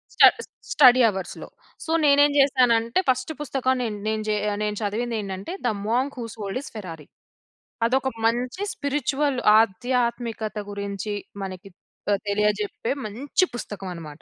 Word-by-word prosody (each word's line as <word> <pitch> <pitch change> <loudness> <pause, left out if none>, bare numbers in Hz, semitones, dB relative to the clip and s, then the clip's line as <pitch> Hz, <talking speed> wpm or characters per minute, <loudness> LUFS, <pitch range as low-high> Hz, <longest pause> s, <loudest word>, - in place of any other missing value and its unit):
Stud - - +7 0.4
study 255 -2 +7
అవర్స్‌లో. 190 -3 -6 0.4
So, 320 - -3
నేనేం 285 0 +5
జేశానంటే, 245 -2 +3
ఫస్ట్ 255 +4 +1
పుస్తకం 260 -2 0
నేన్ 215 -3 -2
నేన్ 220 0 -1
జే 210 - +1 0.2
ఆహ్, 205 - -3
నేను 210 0 -1
చదివిందేంటంటే, 210 - -3
the 245 - +3 0.2
monk 260 +5 0
who - - -3
sold 205 +2 -4
his 285 - -10
Ferrari. 165 -8 -8 0.8
అదొక 265 +2 +1 0.2
మంచి 245 - 0
స్పిరిచువల్ 285 -1 -1 0.2
ఆధ్యాత్మికత 235 0 -1
గురించి 200 0 -4 0.3
మనకి 190 0 -7 0.4
త 205 - +3
తెలియజెప్పే 210 +1 0
మంచి 270 - 0
పుస్తకం 205 -4 -6
అనమాట. 155 -3 -10
230 Hz, 130 wpm, -24 LUFS, 205-260 Hz, 0.8 s, Stud